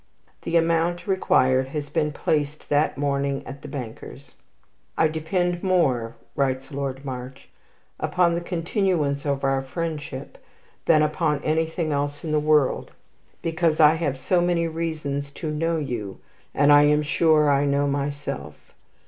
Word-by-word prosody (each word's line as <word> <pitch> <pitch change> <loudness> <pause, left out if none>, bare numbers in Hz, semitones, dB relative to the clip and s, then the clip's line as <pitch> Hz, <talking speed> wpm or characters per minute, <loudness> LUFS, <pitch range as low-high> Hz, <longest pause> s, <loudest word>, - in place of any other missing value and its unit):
The 170 - +1
amount 170 +1 +1
required 130 -9 +2
has 145 +1 -5
been 150 0 0
placed 150 0 -2
that 145 0 +2
morning 140 -1 -1
at 140 +1 -9
the - - -9
banker's. 135 0 -8 0.6
"I 160 - +4
depend 175 +3 -1
more," 130 -12 +1 0.2
writes 135 0 -1
Lord 135 -1 -4
March, 130 0 -7 0.5
"upon 180 -2 +2
the 170 - -1
continuance 170 -5 -1
of 140 -1 -1
our 135 0 +1
friendship 145 -1 -5 0.5
than 155 -2 +5
upon 150 -1 0
anything 160 +1 0
else 145 0 -2
in 155 - -3
the 155 - +3
world, 150 -3 +2 0.5
because 165 -1 +1
I 155 -1 +7
have 155 -5 -2
so 175 +6 +1
many 175 -1 +1
reasons 155 -4 -3
to 155 0 -4
know 165 +2 0
you, 120 -10 -4 0.3
and 145 +1 +4
I 145 0 +7
am 150 0 +3
sure 150 0 +3
I 140 +1 +3
know 140 0 +2
myself. 140 - -4
150 Hz, 145 wpm, -24 LUFS, 140-165 Hz, 0.6 s, I